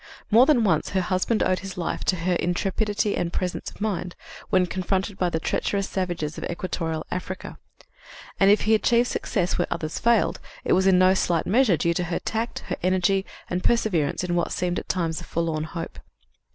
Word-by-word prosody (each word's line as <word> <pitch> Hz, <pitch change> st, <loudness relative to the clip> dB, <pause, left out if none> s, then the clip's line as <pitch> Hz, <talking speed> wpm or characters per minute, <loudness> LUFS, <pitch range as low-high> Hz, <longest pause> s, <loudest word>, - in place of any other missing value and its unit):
More 235 Hz, +5 st, +7 dB
than 275 Hz, -7 st, +4 dB
once 160 Hz, -7 st, +2 dB
her -, -, +3 dB
husband 185 Hz, +5 st, +1 dB
owed 185 Hz, -, +1 dB
his 195 Hz, -1 st, -8 dB
life 170 Hz, -, -2 dB
to 185 Hz, -, +2 dB
her 180 Hz, +1 st, 0 dB
intrepidity 200 Hz, +4 st, 0 dB
and 170 Hz, -, -1 dB
presence 180 Hz, -1 st, -3 dB
of -, -, -17 dB
mind, 190 Hz, -4 st, -2 dB, 0.3 s
when 185 Hz, -3 st, +3 dB
confronted 190 Hz, +2 st, -2 dB
by 180 Hz, -, +2 dB
the 160 Hz, -, -1 dB
treacherous 195 Hz, +4 st, -1 dB
savages 175 Hz, -5 st, -3 dB
of -, -, -7 dB
equatorial 165 Hz, -2 st, -3 dB
Africa; 185 Hz, +1 st, -5 dB, 0.8 s
and, 195 Hz, -, +6 dB
if 205 Hz, -, +5 dB
he 220 Hz, -, +2 dB
achieved 235 Hz, +2 st, +3 dB
success 180 Hz, +1 st, -1 dB
where -, -, +1 dB
others 155 Hz, 0 st, -3 dB
failed, 235 Hz, -2 st, +2 dB, 0.3 s
it -, -, +3 dB
was 190 Hz, +1 st, +3 dB
in 190 Hz, -1 st, +6 dB
no 185 Hz, +1 st, +5 dB
slight 175 Hz, -3 st, +1 dB
measure 220 Hz, -4 st, +3 dB
due 170 Hz, +3 st, +1 dB
to 175 Hz, +1 st, -1 dB
her 170 Hz, 0 st, -2 dB
tact, 225 Hz, +1 st, -3 dB
her -, -, -3 dB
energy 185 Hz, +1 st, +1 dB, 0.2 s
and 180 Hz, +1 st, -2 dB
perseverance 185 Hz, -11 st, +1 dB
in 180 Hz, -1 st, -1 dB
what 175 Hz, -1 st, 0 dB
seemed 175 Hz, 0 st, -1 dB
at -, -, -11 dB
times 165 Hz, -3 st, -1 dB
a -, -, -9 dB
forlorn 160 Hz, -2 st, -2 dB
hope. 165 Hz, +1 st, -6 dB
185 Hz, 195 wpm, -25 LUFS, 170-200 Hz, 0.8 s, More